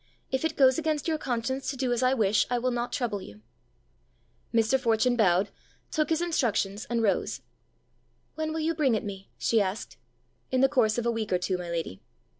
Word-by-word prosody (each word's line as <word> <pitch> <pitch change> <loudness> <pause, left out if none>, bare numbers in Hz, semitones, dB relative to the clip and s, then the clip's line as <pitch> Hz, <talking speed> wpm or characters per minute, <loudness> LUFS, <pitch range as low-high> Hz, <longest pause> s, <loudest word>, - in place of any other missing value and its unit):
If 265 +2 0
it 320 - -1
goes 260 +1 +5
against 310 -2 -1
your 315 -2 0
conscience 260 +1 -2
to 275 - -4
do 250 -1 0
as 240 - 0
I 255 +1 +3
wish, 210 -3 +2
I 245 - +1
will 250 +1 0
not 240 0 -2
trouble 220 -6 -2
you." 105 - -12 1.1
Mr. 230 +3 +3
Fortune 240 +1 +2
bowed, 195 -3 +3 0.4
took 310 -1 0
his 325 +1 +1
instructions, 220 - 0
and 235 -1 0
rose. 205 - 0 0.9
"When 315 0 -3
will 320 0 -2
you 325 +1 +1
bring 285 -7 +2
it 215 - -2
me?" 195 -2 -7
she 225 -2 +2
asked. 195 +2 -3 0.5
"In 255 0 +1
the 270 - +6
course 240 -6 +2
of 240 - -1
a 235 - +2
week 225 -3 -3
or 180 - +4
two, 185 +1 -1
my 180 -1 -5
lady." 165 - -4
240 Hz, 205 wpm, -28 LUFS, 210-270 Hz, 1.1 s, the